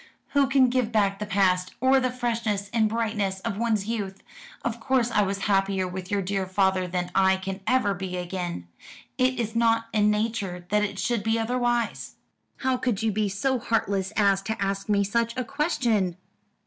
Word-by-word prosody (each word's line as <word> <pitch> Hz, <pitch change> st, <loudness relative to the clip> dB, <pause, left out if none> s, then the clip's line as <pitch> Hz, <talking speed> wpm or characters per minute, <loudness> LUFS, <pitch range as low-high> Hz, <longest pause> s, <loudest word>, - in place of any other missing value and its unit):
"Who 280 Hz, -1 st, +3 dB
can 265 Hz, -1 st, +4 dB
give 250 Hz, -3 st, 0 dB
back 200 Hz, -3 st, +1 dB
the 210 Hz, -, -4 dB
past, 185 Hz, -2 st, +1 dB
or 265 Hz, +1 st, +4 dB
the 255 Hz, -1 st, 0 dB
freshness 230 Hz, -5 st, -2 dB
and 220 Hz, -2 st, +3 dB
brightness 210 Hz, -4 st, -1 dB
of 210 Hz, -2 st, -3 dB
one's 220 Hz, -4 st, +1 dB
youth? 205 Hz, -4 st, -4 dB, 0.4 s
Of 235 Hz, 0 st, -2 dB
course 245 Hz, 0 st, +1 dB
I 210 Hz, -, +3 dB
was 195 Hz, 0 st, -1 dB
happier 195 Hz, -2 st, +1 dB
with 180 Hz, 0 st, -6 dB
your 200 Hz, -1 st, 0 dB
dear 195 Hz, 0 st, -2 dB
father 190 Hz, -1 st, +1 dB
than 180 Hz, 0 st, -3 dB
I 190 Hz, 0 st, +4 dB
can 190 Hz, +1 st, -5 dB
ever 255 Hz, -6 st, +3 dB
be 180 Hz, -1 st, -5 dB
again. 175 Hz, -, -4 dB, 0.5 s
It 255 Hz, 0 st, +2 dB
is 225 Hz, -1 st, -2 dB
not 230 Hz, 0 st, +2 dB
in 210 Hz, -1 st, +3 dB
nature 210 Hz, -5 st, -2 dB
that 210 Hz, 0 st, +2 dB
it 200 Hz, -1 st, -3 dB
should 220 Hz, +3 st, 0 dB
be 225 Hz, +2 st, +1 dB
otherwise. 240 Hz, 0 st, -1 dB, 0.5 s
How 260 Hz, -1 st, +1 dB
could 245 Hz, -4 st, -1 dB
you 225 Hz, -, +2 dB
be 210 Hz, 0 st, 0 dB
so 255 Hz, +7 st, 0 dB
heartless 200 Hz, -4 st, 0 dB
as 200 Hz, -2 st, +3 dB
to 220 Hz, +3 st, -4 dB
ask 195 Hz, +1 st, -2 dB
me 200 Hz, -1 st, +3 dB
such 230 Hz, +4 st, -1 dB
a 255 Hz, -, 0 dB
question?" 230 Hz, -, 0 dB
210 Hz, 185 wpm, -26 LUFS, 195-235 Hz, 0.5 s, can